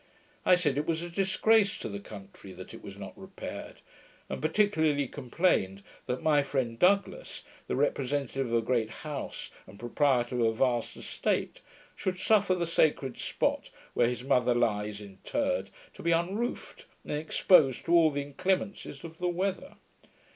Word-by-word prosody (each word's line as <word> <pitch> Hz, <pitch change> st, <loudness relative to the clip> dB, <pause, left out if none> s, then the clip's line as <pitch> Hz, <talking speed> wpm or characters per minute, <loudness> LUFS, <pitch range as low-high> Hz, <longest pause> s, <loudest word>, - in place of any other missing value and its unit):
I 180 Hz, -, +8 dB
said, 150 Hz, -6 st, +1 dB
it 150 Hz, -, -3 dB
was 165 Hz, 0 st, 0 dB
a 175 Hz, -, -6 dB
disgrace 200 Hz, +3 st, +3 dB
to -, -, -5 dB
the 100 Hz, -2 st, -5 dB
country 100 Hz, -2 st, -11 dB
that 95 Hz, 0 st, -10 dB
it -, -, -10 dB
was -, -, -10 dB
not -, -, -8 dB
repaired: -, -, -8 dB, 0.5 s
and 65 Hz, 0 st, -4 dB
particularly 160 Hz, -, +2 dB
complained 120 Hz, -, 0 dB, 0.2 s
that 125 Hz, +1 st, -2 dB
my 150 Hz, -2 st, +4 dB
friend 130 Hz, -5 st, -2 dB
Douglas, 200 Hz, -, +1 dB, 0.2 s
the -, -, -1 dB
representative 135 Hz, -1 st, 0 dB
of 115 Hz, -, -4 dB
a 115 Hz, -, +2 dB
great 115 Hz, -4 st, +1 dB, 0.2 s
house, 150 Hz, -2 st, -5 dB, 0.2 s
and 95 Hz, +2 st, -14 dB
proprietor 125 Hz, 0 st, +1 dB
of 115 Hz, -, +3 dB
a 110 Hz, -, +1 dB
vast 120 Hz, 0 st, 0 dB
estate, -, -, -2 dB, 0.3 s
should 185 Hz, -1 st, -2 dB
suffer 200 Hz, -1 st, +3 dB
the 175 Hz, -1 st, -1 dB
sacred 150 Hz, -6 st, +1 dB
spot -, -, -1 dB, 0.2 s
where 120 Hz, -, +3 dB
his 125 Hz, 0 st, -4 dB
mother 125 Hz, -2 st, +3 dB
lies 105 Hz, -3 st, 0 dB
interred, 270 Hz, -, -2 dB, 0.2 s
to -, -, -11 dB
be 170 Hz, -, +1 dB
unroofed, 190 Hz, +9 st, -2 dB, 0.2 s
and -, -, -4 dB
exposed 150 Hz, -2 st, +3 dB
to 170 Hz, -, +1 dB
all 165 Hz, -2 st, +7 dB
the 145 Hz, -1 st, -2 dB
inclemencies 185 Hz, 0 st, -2 dB
of 165 Hz, -1 st, -10 dB
the 180 Hz, -, 0 dB
weather. 190 Hz, +8 st, -2 dB
145 Hz, 160 wpm, -29 LUFS, 120-180 Hz, 0.5 s, I